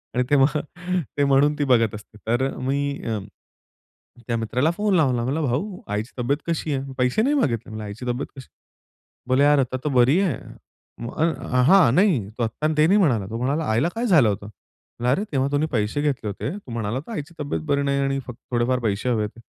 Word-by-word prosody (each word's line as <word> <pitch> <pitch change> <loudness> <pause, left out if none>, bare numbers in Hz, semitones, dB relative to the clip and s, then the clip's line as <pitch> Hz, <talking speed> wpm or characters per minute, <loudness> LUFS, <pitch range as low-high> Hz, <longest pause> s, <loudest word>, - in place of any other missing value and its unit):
आणि 125 - +2
ते 145 - +4
मग 140 +3 +3 0.6
ते 145 - +3
म्हणून 140 +2 +4
ती - - +2
बघत 115 -5 +3
असते. 105 +1 -12
तर 120 +4 +1
मी 135 +2 -1 0.3
अ, 110 -2 -1 1.1
त्या 120 - 0
मित्राला 125 +7 +1
फोन 205 +3 0
लावला, 130 -8 +2
म्हणाला, 140 +6 -1
"भाऊ 155 - -2
आईची 105 +4 -3
तब्येत 130 +4 +1
कशी 160 -2 -1
आहे? 135 0 -3
पैसे 125 +9 +2
नाही 280 +6 +2
मागितले. 115 - -1
आईची 105 +4 -7
तब्येत 125 +3 -2
कशी 130 - -9
आहे? - - -63 0.8
बोले 130 +2 +4
यार, 145 0 +5
"आता 130 -1 0
तर - - +2
बरी 130 +7 +5
आहे." 170 - 0 0.7
मग 120 - -7 0.5
हां, 185 -9 +6
नाही 165 - +3
तो 120 - 0
आत्ता 115 +7 -1
ते 155 - +5
नाही 195 +4 +4
म्हणाला. 125 - +2
तो 115 - -4
म्हणाला, 140 +6 -1
"आईला 115 +10 +2
काय 235 +2 -1
झालं 155 - +5
होतं?" 100 0 -4 0.6
अरे! 165 +11 +2
तेव्हा 135 -1 +1
तुम्ही 145 +2 +1
पैसे 110 +4 0
घेतले 140 -6 -1
होते. 100 - -3
तू 195 -12 -12
म्हणाला 115 +1 -2
तर - - -8
आईची 170 -6 -5
तब्येत 145 -1 -2
बरी 140 0 +2
नाही 140 0 +1
आणि 135 0 0
फक्त 120 -2 -8
थोडेफार 125 +1 +1
पैसे 110 0 -1
हवे 115 -3 +1
आहेत. 105 +2 -7
130 Hz, 205 wpm, -23 LUFS, 115-150 Hz, 1.1 s, हां